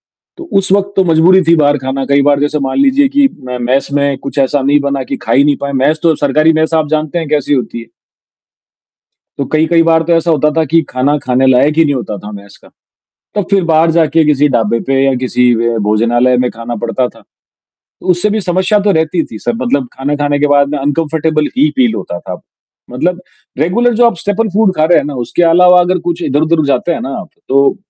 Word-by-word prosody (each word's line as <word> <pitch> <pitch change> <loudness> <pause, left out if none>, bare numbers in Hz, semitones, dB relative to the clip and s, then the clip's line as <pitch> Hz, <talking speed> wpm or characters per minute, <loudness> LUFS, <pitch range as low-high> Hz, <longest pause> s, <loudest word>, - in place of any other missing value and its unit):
तो 345 - -15
उस 190 - -2
वक़्त 200 0 0
तो 190 - +3
मजबूरी 170 +3 +4
थी 170 - +6
बाहर 145 -1 +2
खाना। 135 +1 -4
कई 140 0 +2
बार 145 0 +2
जैसे 145 +1 -1
मान 135 - -2
लीजिए 275 0 +3
कि 280 -1 +4 0.2
म 125 - -4
मेस 130 +3 0
में 140 -1 0
कुछ 140 +2 -7
ऐसा 140 +1 +1
नहीं 145 +2 +2
बना 140 -1 -2
कि - - -5
खा 115 - -3
ही 140 +3 +4
नहीं 145 -1 +2
पाए, 140 0 -3
मेस 140 +4 +1
तो 165 -2 +3
सरकारी 155 +3 +2
मेस 160 +1 0
आप 155 -2 0
जानते 155 +2 -2
हैं 160 - -5
कैसी 145 -1 0
होती 120 -2 -3
है। 115 - -13 1.5
तो 140 - -1
कई-कई 160 +2 +2
बार 165 0 +2
तो 170 +1 -1
ऐसा 165 0 +1
होता 150 -1 +2
था 160 - +2
कि 165 +3 +1
खाना 135 +4 0
खाने 130 +1 +1
लायक 130 +4 +3
ही 165 - +5
नहीं 145 - 0
होता 115 -5 -5
था 105 +3 -10
मेस 100 0 -12
का, - - -18 0.7
तो 205 - 0
फिर 195 -3 +2
बाहर 165 0 +2
जाके 160 -1 +2
किसी 150 0 +2
ढाबे 115 -1 0
पे 135 0 +1
या 135 -1 +2
किसी 125 -1 +2 0.3
भोजनालय 120 +4 +2
में 125 - -1
खाना 115 +1 -7
पड़ता 120 +2 -1
था, 115 - -19 0.8
उससे 180 +3 0
भी 215 - -1
समस्या 185 +2 0
तो 200 0 +1
रहती 160 0 0
थी 110 - -10
सर, 120 +1 -3
मतलब 130 0 -1
खाना, 140 +2 -3
खाने 145 0 -1
के 150 - +2
बाद 145 0 +2
अनकम्फर्टेबल 155 +1 -1
ही 290 +3 +3
फील 245 -4 +2
होता 85 - -5
था, - - -8 0.5
मतलब 175 +8 -2 0.4
रेगुलर 230 +10 +1
जो 240 +2 +4
आप 230 - 0
स्टेपल 205 +4 -1
फ़ूड 210 -3 +2
खा 155 - +2
रहे 170 0 +4
हैं 145 - -1
ना 145 - -5
उसके 175 - -1
अलावा 180 +1 +5
अगर 180 +1 0
कुछ 170 0 -3
इधर-उधर 155 +3 0
जाते 155 +4 0
हैं - - -4
ना 135 - -5
आप - - -11 0.2
तो 140 +1 +2
150 Hz, 225 wpm, -12 LUFS, 135-170 Hz, 1.5 s, थी